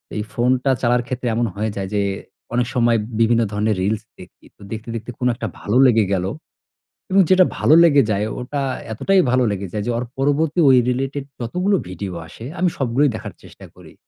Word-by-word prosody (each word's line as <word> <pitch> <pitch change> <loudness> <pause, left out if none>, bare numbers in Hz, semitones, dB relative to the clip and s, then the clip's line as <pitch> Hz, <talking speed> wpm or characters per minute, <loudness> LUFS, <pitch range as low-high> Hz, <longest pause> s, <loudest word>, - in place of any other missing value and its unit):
এই 105 - -2
ফোনটা 130 +2 +1
চালার 120 0 +2
ক্ষেত্রে 125 -1 -3
এমন 120 +1 +1
হয়ে 110 +2 -2
যায় 95 -1 -4
যে 100 - +1 0.5
অনেক 120 0 +1
সময় 120 -1 +3 0.2
বিভিন্ন 115 +1 +3
ধরনের 105 +1 0
reels 105 +2 -1 0.2
দেখি। - - -15
তো - - -23
দেখতে, 110 +1 -6
দেখতে 115 +2 -6
কোনো 125 0 +1
একটা 115 - -4
ভালো 105 +5 0
লেগে 110 -4 +3
গেলো 95 0 -1 0.8
এবং 195 - +4
যেটা 185 -1 +6
ভালো 155 - +4
লেগে 145 -5 +5
যায় 100 +1 0
ওটা 140 +3 -4 0.3
এতটাই 195 - +3
ভালো 130 0 +3
লেগে 100 -1 -4
যায়, 105 -1 -2
যে - - +1
ওর 125 - -2
পরবর্তী 145 +4 +1
ঐ - - +7 0.2
related 135 +2 -2 0.2
যতগুলো 180 - 0
ভিডিও 95 +1 -6
আসে 110 +7 -11
আমি 180 - +3
সবগুলোই 135 +2 +2
দেখার - - -7
চেষ্টা - - -14
করি। - - -15
120 Hz, 190 wpm, -20 LUFS, 110-135 Hz, 0.8 s, ঐ